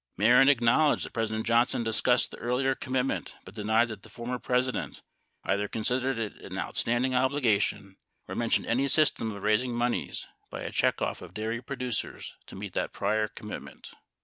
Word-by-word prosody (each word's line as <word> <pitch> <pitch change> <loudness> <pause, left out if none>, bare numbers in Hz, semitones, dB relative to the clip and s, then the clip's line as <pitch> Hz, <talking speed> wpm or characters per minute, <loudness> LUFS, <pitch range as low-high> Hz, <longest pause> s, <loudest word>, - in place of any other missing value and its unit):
1 105 +3 +2
Mehren 130 +3 +7
acknowledged 140 +3 +3
that - - -10
President 110 -1 -2
Johnson 115 +1 +3
discussed 120 +2 +2
the - - -9
earlier 130 +2 0
commitment 130 0 -2
but 95 - -11
denied 110 +2 +2
that 110 -3 -7
the 110 - -15
former 120 +3 -5
President 125 +1 -1 0.4
either 100 +1 0
con 110 - -4
sidered 130 +2 0
it 110 -2 -3
an - - -8
outstanding 120 +2 0
obligation 120 -7 +1 0.3
or - - -6
mentioned 115 -1 +1
any 130 +4 +1
system 140 -6 +3
of 100 -1 -8
raising 120 +3 +2
moneys 120 +1 -1 0.2
by - - -6
a - - -4
checkoff - - 0
of - - -11
dairy 110 +2 -2
producers 125 -1 -4
to - - -11
meet 100 -1 -7
that - - -2
prior 105 +2 0
commitment. 105 0 -9
120 Hz, 175 wpm, -28 LUFS, 110-125 Hz, 0.4 s, Mehren